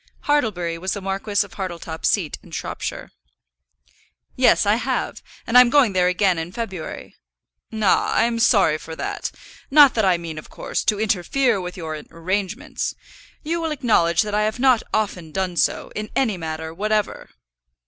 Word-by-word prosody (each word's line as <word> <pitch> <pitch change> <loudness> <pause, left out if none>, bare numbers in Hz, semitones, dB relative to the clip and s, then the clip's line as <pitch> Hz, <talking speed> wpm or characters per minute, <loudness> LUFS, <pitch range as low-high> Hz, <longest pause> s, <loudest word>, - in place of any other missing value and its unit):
Hartlebury 190 - 0
was 190 +2 -2
the 205 - -4
Marquis 195 +2 -1
of 190 - -16
Hartletop's 170 -4 -4
seat 180 -8 -1
in - - -17
Shropshire. - - -5 1.2
"Yes, - - +4
I - - +3
have. - - -2 0.2
And 230 - -3
I'm 250 -1 +9
going 260 -6 +4
there 180 -1 +3
again 180 -1 +2
in 165 +2 -5
February." 190 -6 -6 0.6
"Ah, 220 -4 +2
I'm 230 0 +2
sorry 190 -9 +4
for 160 +1 -8
that. - - -4 0.4
Not 285 -1 +7
that 220 - +1
I 185 -3 +3
mean, 165 -2 -6
of - - -13
course, - - -3
to 210 -2 +1
interfere 220 +2 +1
with 180 +1 -7
your 155 -3 -5
arrangements. 185 +3 -3 0.5
You 335 +2 -2
will 325 - -1
acknowledge 220 - +2
that 210 -1 -5
I 210 - +2
have 215 +2 0
not 255 -2 +4
often 185 -7 -2
done 185 0 -2
so, - - 0
in 215 0 -5
any 240 -7 +1
matter 160 -1 -5
whatever." 210 +3 -1
195 Hz, 165 wpm, -22 LUFS, 170-225 Hz, 1.2 s, I'm